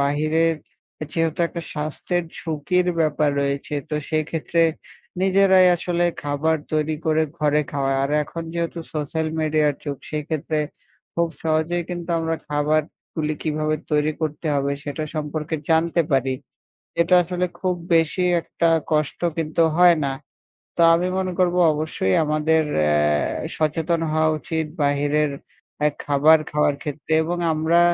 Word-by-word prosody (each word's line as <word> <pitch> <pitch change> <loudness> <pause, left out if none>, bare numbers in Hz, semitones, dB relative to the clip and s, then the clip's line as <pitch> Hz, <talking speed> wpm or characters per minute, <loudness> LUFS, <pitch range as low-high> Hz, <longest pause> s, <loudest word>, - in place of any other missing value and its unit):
বাহিরের 155 +3 +2 0.6
যেহেতু 165 -1 0
একটা 170 - -6
স্বাস্থ্যের 155 +4 -2 0.2
ঝুঁকির 170 +3 0
ব্যাপার 155 -1 +2
রয়েছে। 140 +1 -2 0.2
তো - - -1 0.2
সেক্ষেত্রে 160 +1 0 0.6
নিজেরাই 190 -1 +5
আসলে 175 0 -1 0.2
খাবার 145 +2 0 0.2
তৈরি 155 0 0
করে 160 0 +3 0.2
ঘরে 150 -1 +2
খাওয়া। 135 -1 0
আর 140 - -1
এখন 165 +3 -6
যেহেতু 170 0 -2
সোশ্যাল 155 +1 -2
মিডিয়ার 155 -1 +2
যুগ 145 -2 -3
সেক্ষেত্রে 155 0 -2 0.6
খুব 170 0 +1
সহজেই 160 +2 0
কিন্তু 175 -1 -5
আমরা 165 0 -1
খাবারগুলি 155 +1 -1
কিভাবে 155 0 0
তৈরি 150 0 +2
করতে 155 +1 -3
হবে 140 0 0
সেটা 145 +1 -4
সম্পর্কে 155 +1 -3 0.2
জানতে 165 +1 +3
পারি। 135 -1 +2 0.7
এটা 170 +2 +4
আসলে 180 +1 -1
খুব 185 -1 +1 0.2
বেশি 165 +2 +2 0.2
একটা 170 0 -1 0.2
কষ্ট 150 -2 0 0.2
কিন্তু 160 +1 +1
হয় 175 -1 +7
না। 135 - 0 0.6
তো - - +3
আমি 175 +2 +1
মনে 185 -1 -1
করব 180 -1 +3 0.2
অবশ্যই 150 -11 -1
আমাদের 155 +1 +2 0.2
অ্যা 75 0 +2 0.6
সচেতন 160 +2 0
হওয়া 155 0 +3
উচিত 160 +1 -2 0.2
বাহিরের 145 +1 +2 0.6
এ - - +5 0.2
খাবার 150 +2 +5
খাওয়ার 150 -1 +2
ক্ষেত্রে 150 0 -5
এবং 175 +2 -2
আমরা 160 +2 +3
155 Hz, 135 wpm, -22 LUFS, 150-165 Hz, 0.7 s, হয়